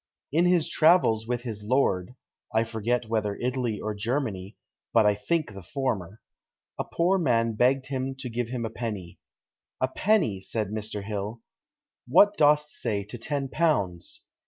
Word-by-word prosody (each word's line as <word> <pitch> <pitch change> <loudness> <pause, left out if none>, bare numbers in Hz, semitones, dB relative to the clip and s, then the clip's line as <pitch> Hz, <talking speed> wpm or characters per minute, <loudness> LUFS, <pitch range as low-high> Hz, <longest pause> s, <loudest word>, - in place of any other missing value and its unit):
"In 165 +5 +3
his 175 -3 +3
travels 155 -10 +4
with 120 0 -2
his 110 -4 -5
lord 105 -4 +1 0.4
(I 110 +1 +3
forget 115 +1 -1
whether 105 -2 -1
Italy 125 -3 -2
or 110 - -3
Germany, 105 -3 -3 0.4
but 115 -2 +5
I 105 - +5
think 145 +5 -1
the 100 - -9
former), 105 - -3 0.6
a - - -1
poor 180 +3 +1
man 115 -7 +2
begged 130 +4 +2
him 135 -1 -3
to 135 -1 -6
give 120 0 -2
him 120 -2 -3
a 110 - -4
penny. 105 -7 -5 0.6
'A 130 - +1
penny!' 160 - +1
said 105 +1 0
Mr. 105 -1 -4
Hill; 105 +2 -4 0.7
'what 205 +11 +6
dost 150 -2 +4
say 105 -4 -2
to 120 +4 -8
ten 140 +2 -2
pounds?' 100 - -1
115 Hz, 160 wpm, -27 LUFS, 105-135 Hz, 0.7 s, what